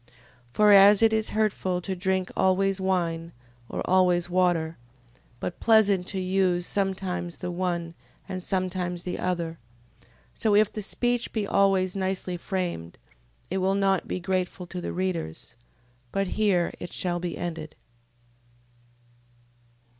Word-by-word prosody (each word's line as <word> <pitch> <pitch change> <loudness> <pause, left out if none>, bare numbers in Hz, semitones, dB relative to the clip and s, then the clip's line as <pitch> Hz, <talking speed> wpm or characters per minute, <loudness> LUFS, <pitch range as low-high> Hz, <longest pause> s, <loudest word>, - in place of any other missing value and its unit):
For 210 +8 +5
as 200 +2 +8
it 225 0 +5
is 220 0 +1
hurtful 200 -4 0
to 190 +1 -3
drink 185 0 -1
always 190 +1 +2
wine, 170 -3 -1 0.4
or - - -3
always 180 -1 +3
water, 175 -3 +1 0.6
but 175 - -5
pleasant 205 -5 +4
to 190 - -3
use 185 -1 +1
sometimes 185 -3 -2
the 180 - -4
one, 175 -2 -2 0.3
and 185 -2 -5
sometimes 180 -1 -2
the 180 - -4
other: 170 -3 -2 0.7
so 215 -2 +1
if 210 0 +4
the 215 - -4
speech 240 +3 -1
be 215 -3 -1
always 195 -2 +2
nicely 190 -1 -2
framed, 175 - -4 0.5
it 190 - 0
will 190 +1 +1
not 195 -1 +1
be - - -3
grateful 185 0 -2
to 180 +1 -6
the - - -4
readers. 180 - -3 0.6
But 195 0 0
here 195 -5 +1
it 175 - -7
shall 175 -1 -2
be 175 -2 -4
ended. 160 -3 -5
185 Hz, 135 wpm, -26 LUFS, 175-195 Hz, 0.7 s, as